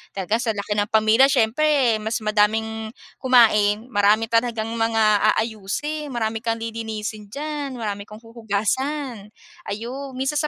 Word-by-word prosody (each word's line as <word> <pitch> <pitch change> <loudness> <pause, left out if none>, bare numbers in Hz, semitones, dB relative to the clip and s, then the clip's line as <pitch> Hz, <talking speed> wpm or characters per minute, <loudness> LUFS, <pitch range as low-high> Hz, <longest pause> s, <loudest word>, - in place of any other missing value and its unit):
Talaga 200 +3 0
sa 235 -2 -1
laki 205 +1 -3
ng 205 - +1
pamilya, 220 +4 +5
siyempre 265 -1 +2
mas 220 +2 -3
madaming 220 +1 0 0.3
kumain, 220 -5 +4
marami 210 +2 +3
talagang 230 -1 0
mga 220 -2 +3
aayusin, 230 +8 -3
marami 225 -2 -2
kang 230 0 -1
lilinisin 220 -2 -5
diyan, 285 +3 -5
marami 205 -3 -5
kang 210 +1 -12
huhugasan, 230 +2 -3 0.4
ayun. 255 +6 -6
Minsan 270 +3 -1
225 Hz, 125 wpm, -22 LUFS, 215-250 Hz, 0.4 s, pamilya